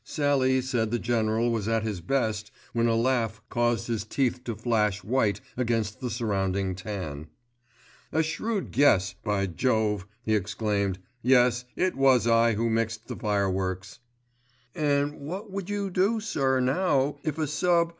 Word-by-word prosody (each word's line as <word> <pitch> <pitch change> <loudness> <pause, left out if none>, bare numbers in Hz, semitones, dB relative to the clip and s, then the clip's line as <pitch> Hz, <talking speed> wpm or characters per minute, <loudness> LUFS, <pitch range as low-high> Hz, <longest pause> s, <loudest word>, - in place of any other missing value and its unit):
Sallie 135 -3 +2
said 125 -4 -1
the 120 - 0
General 115 0 +1
was 110 -3 -1
at 115 -1 +1
his 105 -5 -3
best 110 0 -1 0.2
when 115 0 +2
a 115 - +2
laugh 115 -2 +1
caused 120 -1 +1
his 115 -3 -2
teeth 125 +2 -1
to 115 - -3
flash 105 -3 0
white 110 -2 +1
against 115 -4 -1
the 125 - -3
surrounding 100 -5 -1
tan. 90 -6 -6 0.8
"A 160 - +2
shrewd 195 +6 -2
guess, 110 -10 +4
by 105 -2 0
jove," 105 +1 0 0.2
he 110 - 0
exclaimed, 100 -1 0 0.2
"Yes, 125 -1 +4
it 185 0 0
was 135 -3 +4
I 115 0 +4
who 115 +2 0
mixed 115 -1 -1
the - - -4
fireworks." 95 -3 -1 0.7
"And 145 -1 0
what 185 +9 -6
would 195 -1 -5
you 200 -1 -2
do 195 +5 +2
sir 135 -11 0
now 140 +1 +1
if 155 -1 -2
a 155 - 0
sub. 170 +3 +2
115 Hz, 155 wpm, -27 LUFS, 105-135 Hz, 0.8 s, guess